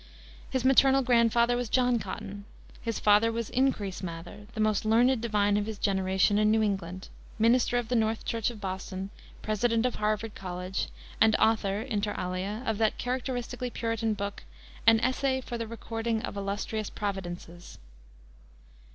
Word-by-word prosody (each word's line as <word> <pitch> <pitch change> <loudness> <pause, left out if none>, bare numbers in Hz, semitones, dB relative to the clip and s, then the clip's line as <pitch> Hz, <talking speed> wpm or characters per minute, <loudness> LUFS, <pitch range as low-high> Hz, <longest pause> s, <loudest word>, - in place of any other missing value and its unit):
His 260 -1 -1
maternal 270 0 +5
grandfather 235 0 +3
was 245 -2 -2
John 245 -1 +3
Cotton. 200 0 -7 0.4
His 230 -2 -2
father 210 +2 +4
was 230 -1 -3
Increase 240 -8 0
Mather, 175 +3 -7
the - - -5
most 215 -1 +2
learned 235 +3 +3
divine 205 -3 +2
of 210 0 -1
his 220 -2 -5
generation 190 +1 +2
in 215 0 +4
New 220 0 +3
England, 190 -3 -3 0.3
minister 235 +2 +3
of 240 -2 -1
the 250 - 0
North 225 -1 +1
Church 230 -1 0
of 235 -3 -8
Boston, 190 0 -5 0.3
President 230 +2 +1
of 250 - +1
Harvard 215 0 -1
College, 180 0 -4 0.3
and 220 -1 +6
author, 210 -2 +2
inter 210 -5 -2
alia, 185 +5 -3
of 220 -1 -1
that 220 -1 +2
characteristically 250 0 -3
Puritan 230 -2 -1
book, 200 0 -4 0.5
An 225 -1 +7
Essay 260 +1 +1
for 240 -2 -6
the 230 - -3
Recording 225 0 -3
of - - -5
Illustrious 205 +2 -3
Providences. 175 -3 -6
220 Hz, 155 wpm, -29 LUFS, 200-235 Hz, 0.5 s, An